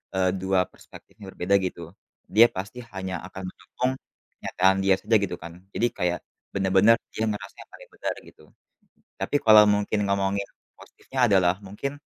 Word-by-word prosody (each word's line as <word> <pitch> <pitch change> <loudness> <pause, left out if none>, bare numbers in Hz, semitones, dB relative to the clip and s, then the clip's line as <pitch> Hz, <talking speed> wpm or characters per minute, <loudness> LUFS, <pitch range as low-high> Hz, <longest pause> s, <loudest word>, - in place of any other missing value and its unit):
eee, 95 -1 +2
2 95 0 +1
perspektif - - -16
yang 95 -2 -9
berbeda 95 +3 +1
gitu. 90 -2 -5 0.5
Dia 115 +2 +9
pasti 100 +6 -6
hanya 95 -1 -4
akan 95 0 -9
ngomong, 125 +1 -3 0.5
kenyataan 95 +1 +2
dia 95 - +5
saja 110 - +2
gitu 90 - -2
kan. 85 0 -8 0.2
Jadi 120 - +2
kayak, 90 0 0 0.4
benar-benar 95 +4 +4 0.2
dia 110 - -1
ngerasa 105 - -7
yang - - -32
paling - - -14
benar, - - -3
gitu. - - -18 0.8
Tapi - - -2
kalau 110 -1 +9
mungkin 105 +1 +1
ngomongin 100 0 0 0.3
positifnya 135 - -9
adalah, 95 -3 +3
mungkin, 120 +8 -4
95 Hz, 160 wpm, -25 LUFS, 95-105 Hz, 0.8 s, Dia